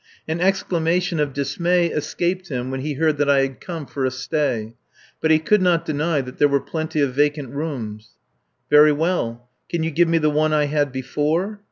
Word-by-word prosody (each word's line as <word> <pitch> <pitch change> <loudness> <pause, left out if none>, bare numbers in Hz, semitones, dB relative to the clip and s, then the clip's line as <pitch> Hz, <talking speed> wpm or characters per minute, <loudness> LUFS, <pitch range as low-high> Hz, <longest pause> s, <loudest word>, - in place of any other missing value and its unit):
An 160 +2 -2
exclamation 180 -2 +1
of 145 -1 0
dismay 170 +6 +1
escaped 175 +4 -2
him 130 -2 -3
when 135 - -3
he 150 +3 -3
heard 155 +1 +1
that 145 -1 +2
I 140 -1 +5
had 135 -1 -3
come 165 -4 -6
for 135 0 -4
a 130 - +2
stay; 130 -4 -2 0.5
but 160 - +1
he 160 - +6
could 190 +6 +2
not 175 -2 +2
deny 155 0 0
that 125 -1 -10
there 145 - +6
were 140 -1 +2
plenty 160 0 -3
of 140 -3 +1
vacant 145 -1 +1
rooms. 115 -8 -6 0.5
"Very 150 +2 +7
well. 145 -7 -1 0.2
Can 170 -2 -1
you 165 - -1
give 170 +3 +3
me 165 0 +2
the 155 -1 +2
one 155 +1 +1
I 150 -1 +3
had 145 -1 0
before?" 150 +10 -1
150 Hz, 200 wpm, -21 LUFS, 135-165 Hz, 0.5 s, Very